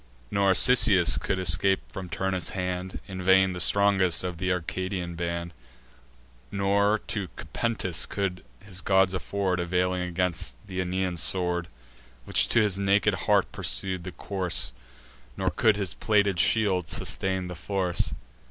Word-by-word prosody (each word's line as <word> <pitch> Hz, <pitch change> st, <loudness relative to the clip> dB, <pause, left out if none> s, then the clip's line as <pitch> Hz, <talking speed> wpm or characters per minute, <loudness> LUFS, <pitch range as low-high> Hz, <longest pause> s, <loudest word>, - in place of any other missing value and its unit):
Nor, 100 Hz, -1 st, +2 dB
Cisseus, 105 Hz, -8 st, +6 dB
couldst 95 Hz, -2 st, +2 dB
thou 85 Hz, -, +5 dB
scape 95 Hz, -1 st, +1 dB
from 95 Hz, -2 st, -7 dB
Turnus' 95 Hz, +1 st, -2 dB
hand, 90 Hz, 0 st, -4 dB
In 95 Hz, -2 st, -7 dB
vain 95 Hz, 0 st, +4 dB
the 90 Hz, -, -6 dB
strongest 95 Hz, -2 st, +3 dB
of 90 Hz, -2 st, -4 dB
th' 90 Hz, +1 st, -2 dB
Arcadian 90 Hz, 0 st, -3 dB
band: 85 Hz, 0 st, -4 dB, 1.0 s
Nor 100 Hz, +2 st, +1 dB
to 100 Hz, -5 st, -3 dB
Cupentus 105 Hz, -7 st, -2 dB
could 95 Hz, -3 st, -3 dB, 0.2 s
his 95 Hz, -2 st, -6 dB
gods 95 Hz, 0 st, +2 dB
afford 95 Hz, 0 st, -2 dB
Availing 90 Hz, +1 st, -1 dB
aid 90 Hz, -, -3 dB
against 90 Hz, -7 st, -2 dB
th' 100 Hz, -, -15 dB
Aenean 90 Hz, 0 st, -2 dB
sword, 90 Hz, -1 st, +1 dB, 0.6 s
Which -, -, +1 dB
to 120 Hz, -, +3 dB
his 100 Hz, -3 st, +1 dB
naked 100 Hz, +1 st, +2 dB
heart -, -, +1 dB
pursued 95 Hz, -2 st, -1 dB
the 95 Hz, -, -7 dB
course; 90 Hz, -9 st, 0 dB, 0.6 s
Nor -, -, -1 dB
could 110 Hz, -2 st, +2 dB
his 95 Hz, -5 st, -3 dB
plated 100 Hz, -4 st, +1 dB
shield 95 Hz, -2 st, +1 dB
sustain 95 Hz, +4 st, -2 dB
the 90 Hz, -, -6 dB
force. 90 Hz, 0 st, -1 dB
95 Hz, 145 wpm, -26 LUFS, 90-100 Hz, 1.0 s, Cisseus